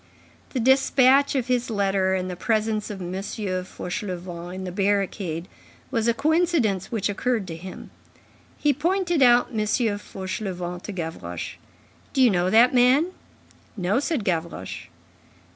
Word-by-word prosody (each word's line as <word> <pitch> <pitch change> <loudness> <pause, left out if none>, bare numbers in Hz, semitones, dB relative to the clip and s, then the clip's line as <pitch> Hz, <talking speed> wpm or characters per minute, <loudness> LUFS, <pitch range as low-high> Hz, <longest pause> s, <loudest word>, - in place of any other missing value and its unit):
The 260 - -3
despatch 265 +2 +4
of 260 -3 +1
his 245 -1 0
letter 195 -3 +1
and 185 -1 -2
the 180 - -4
presence 215 +1 0
of 195 -3 -6
M. 175 +1 -5
Fauchelevent 185 -3 -5
in 190 - -5
the 185 - -4
barricade, 190 -3 -1 0.4
was 230 -3 0
a 235 - +4
coincidence 295 - +1
which 220 -4 0
occurred 220 +1 -1
to 165 - -5
him. 185 +3 -9 0.7
He 295 -1 +2
pointed 345 +2 0
out 245 -1 +6
M. 225 - -2
Fauchelevent 195 -5 -2
to - - -5
Gavroche. 160 - -5 0.6
"Do 265 - +2
you 245 - +6
know 180 -1 +1
that 235 +5 +6
man?" 260 +8 +4 0.7
"No," 195 +5 +1
said 290 -5 -1
Gavroche. 170 -4 -3
210 Hz, 140 wpm, -24 LUFS, 185-250 Hz, 0.7 s, out